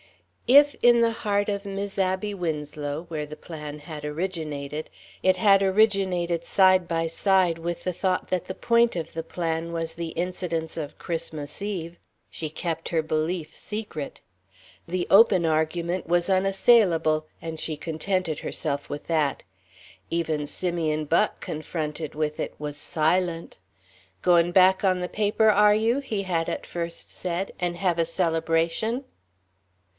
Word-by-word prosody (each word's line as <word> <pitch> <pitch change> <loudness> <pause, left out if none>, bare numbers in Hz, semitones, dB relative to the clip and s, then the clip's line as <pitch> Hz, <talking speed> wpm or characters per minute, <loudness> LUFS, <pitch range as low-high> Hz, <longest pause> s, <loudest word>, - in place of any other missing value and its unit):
If, 285 +3 +7
in 240 0 +6
the 230 0 +3
heart 205 -3 0
of 200 -1 -2
Mis' 200 0 -5
Abby 190 +2 0
Winslow, 150 -3 -4
where 155 -3 -4
the 155 +1 -9
plan 150 -2 -8
had 150 0 -8
originated, 150 -2 -4 0.3
it 185 0 +4
had 195 0 +5
originated 190 -4 +2
side 185 0 +4
by 165 -1 0
side 185 0 +2
with 170 +1 -4
the 180 - 0
thought 185 +1 -1
that 185 -2 0
the 185 - -6
point 235 -3 +3
of 165 - -5
the 165 0 -4
plan 165 0 -3
was 165 -1 -2
the 170 0 -4
incidence 170 -1 -3
of 150 -3 -6
Christmas 155 -2 -5
Eve, 175 -5 -4 0.3
she 155 - -4
kept 165 +1 -4
her 165 -2 +1
belief 155 +1 -2
secret. 205 -9 -5 0.7
The 175 +1 -2
open 195 -4 +6
argument 165 +3 0
was 175 +2 +2
unassailable, 190 -5 +3
and 165 -1 -5
she 155 -1 -3
contented 165 0 -2
herself 145 -2 -3
with 145 - -6
that. 155 -4 0 0.7
Even 160 -3 -1
Simeon 160 -3 -1
Buck, 165 +3 +1
confronted 155 0 -4
with 150 0 -2
it, - - -4
was 150 -1 -4
silent. 165 +3 0 0.7
"Goin' 175 -1 +4
back 190 +1 +5
on 185 -2 +3
the 180 - -2
paper, 215 +2 +2
are 210 0 +5
you?" 225 +5 +2
he 215 -8 -3
had 170 -3 -1
at - - -4
first 170 -1 -5
said, 180 +2 -3
"and 175 -1 -1
hev 175 -2 0
a 165 - +3
celebration?" 165 +8 0
170 Hz, 150 wpm, -25 LUFS, 160-190 Hz, 0.7 s, If